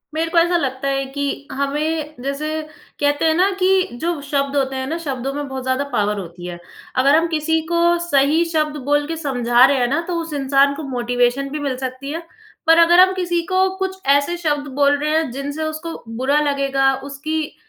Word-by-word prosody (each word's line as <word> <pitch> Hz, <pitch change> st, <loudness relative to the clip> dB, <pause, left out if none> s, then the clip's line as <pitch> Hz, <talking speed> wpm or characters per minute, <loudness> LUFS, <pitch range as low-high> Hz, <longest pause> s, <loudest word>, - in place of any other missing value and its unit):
मेरे 325 Hz, +1 st, 0 dB
को 340 Hz, -, 0 dB
ऐसा 345 Hz, +1 st, +4 dB
लगता 270 Hz, -3 st, -2 dB
है 275 Hz, 0 st, 0 dB
कि 285 Hz, 0 st, -2 dB, 0.3 s
हमें 300 Hz, +3 st, -2 dB
जैसे 280 Hz, +3 st, -3 dB, 0.5 s
कहते 290 Hz, +2 st, +1 dB
हैं 320 Hz, -, +4 dB
ना 370 Hz, +4 st, +3 dB
कि 375 Hz, 0 st, +3 dB, 0.2 s
जो 340 Hz, -2 st, -1 dB
शब्द 280 Hz, 0 st, -1 dB
होते 270 Hz, -1 st, 0 dB
हैं 260 Hz, 0 st, -3 dB
ना 325 Hz, -, -2 dB
शब्दों 270 Hz, -1 st, -3 dB
में 290 Hz, 0 st, -4 dB
बहुत 265 Hz, -1 st, -5 dB
ज़्यादा 260 Hz, +2 st, 0 dB
पावर 210 Hz, 0 st, 0 dB
होती 175 Hz, -1 st, -9 dB
है। 175 Hz, -1 st, -7 dB, 0.4 s
अगर 275 Hz, +3 st, +4 dB
हम 330 Hz, +1 st, +3 dB
किसी 320 Hz, 0 st, 0 dB
को 340 Hz, -, +2 dB, 0.3 s
सही 290 Hz, +2 st, +3 dB
शब्द 305 Hz, -1 st, 0 dB
बोल 290 Hz, 0 st, +2 dB
के 330 Hz, -, -3 dB
समझा 245 Hz, -5 st, +2 dB
रहे 275 Hz, 0 st, +2 dB
हैं 245 Hz, -1 st, +2 dB
ना 290 Hz, +6 st, 0 dB
तो 355 Hz, -, -2 dB
उस 325 Hz, -1 st, -7 dB
इंसान 280 Hz, 0 st, +3 dB
को 315 Hz, -, -6 dB
मोटिवेशन 245 Hz, +2 st, 0 dB
भी 300 Hz, -, -4 dB
मिल 280 Hz, -3 st, -2 dB
सकती 260 Hz, +2 st, -5 dB
है। 330 Hz, -, -4 dB, 0.5 s
पर 325 Hz, 0 st, +7 dB
अगर 345 Hz, +1 st, +6 dB
हम 375 Hz, 0 st, +6 dB
किसी 350 Hz, -2 st, -1 dB
को 375 Hz, 0 st, +2 dB
कुछ 380 Hz, 0 st, -3 dB, 0.2 s
ऐसे 315 Hz, +5 st, -2 dB
शब्द 295 Hz, -4 st, -1 dB
बोल 285 Hz, 0 st, +3 dB
रहे 300 Hz, +1 st, -1 dB
हैं 320 Hz, -3 st, 0 dB
जिनसे 285 Hz, +4 st, -4 dB
उसको 315 Hz, +1 st, -5 dB
बुरा 275 Hz, +4 st, +2 dB
लगेगा, 275 Hz, -2 st, +1 dB
उसकी 285 Hz, +3 st, -4 dB
285 Hz, 205 wpm, -20 LUFS, 270-320 Hz, 0.5 s, पर